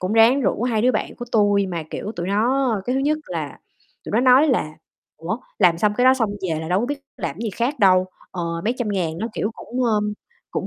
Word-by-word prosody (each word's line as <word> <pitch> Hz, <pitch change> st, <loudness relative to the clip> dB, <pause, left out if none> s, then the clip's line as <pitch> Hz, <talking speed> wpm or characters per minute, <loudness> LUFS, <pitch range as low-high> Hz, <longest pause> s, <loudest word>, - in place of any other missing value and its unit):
cũng 185 Hz, +3 st, -2 dB
ráng 225 Hz, +5 st, +5 dB
rủ 235 Hz, -, 0 dB
2 230 Hz, -3 st, +1 dB
đứa 255 Hz, +1 st, +4 dB
bạn -, -, -2 dB
của 240 Hz, -, -6 dB
tui 205 Hz, -2 st, +3 dB
mà, 170 Hz, -3 st, -4 dB
kiểu, 210 Hz, -, -5 dB
tụi 175 Hz, -, -3 dB
nó 240 Hz, +4 st, +2 dB
cái 250 Hz, -, -1 dB
thứ 265 Hz, -, +1 dB
nhất 300 Hz, +2 st, +1 dB
là -, -, -5 dB, 0.5 s
tụi -, -, -7 dB
nó 220 Hz, -, +3 dB
nói 260 Hz, +4 st, +6 dB
là 230 Hz, -, +1 dB, 0.5 s
"Ủa, 180 Hz, +9 st, -4 dB, 0.2 s
làm 175 Hz, -4 st, +4 dB
xong 210 Hz, +3 st, +2 dB
cái 245 Hz, -, +2 dB
đó 260 Hz, +1 st, +7 dB
xong 225 Hz, -5 st, 0 dB, 0.2 s
về 160 Hz, -1 st, -1 dB
là 160 Hz, -, -6 dB
đâu 185 Hz, +3 st, +2 dB
có 240 Hz, -, -1 dB
biết 285 Hz, +1 st, -4 dB, 0.2 s
làm -, -, -4 dB
gì 230 Hz, -2 st, -2 dB
khác 240 Hz, +8 st, -2 dB
đâu, 185 Hz, -2 st, +5 dB, 0.2 s
ờ, 180 Hz, -, -4 dB, 0.2 s
mấy 235 Hz, +4 st, +1 dB
trăm 240 Hz, -4 st, -1 dB
ngàn 170 Hz, -5 st, -2 dB
nó, 220 Hz, -, -2 dB
kiểu, 210 Hz, -, -2 dB
cũng, 250 Hz, +1 st, -3 dB
ờm, 210 Hz, -2 st, +1 dB, 0.4 s
cũng -, -, -3 dB
220 Hz, 250 wpm, -22 LUFS, 190-250 Hz, 0.5 s, đó